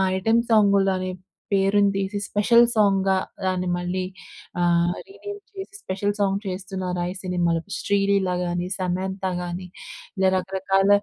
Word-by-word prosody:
Item 225 +5 +3
సాంగులనే 195 -3 +3 0.4
పేరుని 200 +1 +3
తీసి 195 +1 -1
special 235 +3 +5
సాంగ్‌గా 195 -2 +3 0.3
దాన్ని 185 -1 0
మళ్ళీ 180 +1 -2 0.6
అహ్, 175 0 +3
రీనేమ్ 410 +1 -8
చేసి, 390 -1 -8
స్పెషల్ 200 +2 -1
సాంగ్ 195 -1 +1
చేస్తున్నారా 185 -1 -3
ఈ - - -17
సినిమా‌లో. 170 -2 0 0.2
శ్రీలీల 200 -2 +2
గాని, 175 0 -2
సమంతా 190 +1 -2
గాని, 175 +1 -5 0.5
ఇలా 190 0 +4
రకరకాల 195 +1 +1
190 Hz, 120 wpm, -24 LUFS, 185-200 Hz, 0.6 s, స్పెషల్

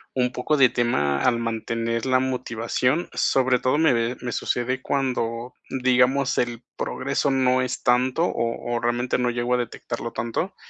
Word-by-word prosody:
un 125 -1 +1
poco 140 +5 0
de 130 -3 +6
tema 75 - +1
al 125 -2 +3
mantener 115 +1 -2
la 130 0 +4
motivación, 125 +3 -1
sobre 130 -2 +2
todo 130 +3 +1
me, 125 -6 +2
eh, - - -12
me 125 - -3
sucede 125 +3 -1
cuando, 125 -3 -2 0.2
digamos, 130 +1 +2
el 120 -1 -2
progreso - - -1
no 130 -1 +2
es 125 0 -3
tanto, 125 +6 +2
o 120 -3 -2
o - - 0
realmente 120 +2 0
no 125 - +1
llego 120 +1 -1
a - - +3
detectarlo 120 -1 -4
tanto. 120 +12 -3
125 Hz, 165 wpm, -24 LUFS, 115-130 Hz, 0.2 s, de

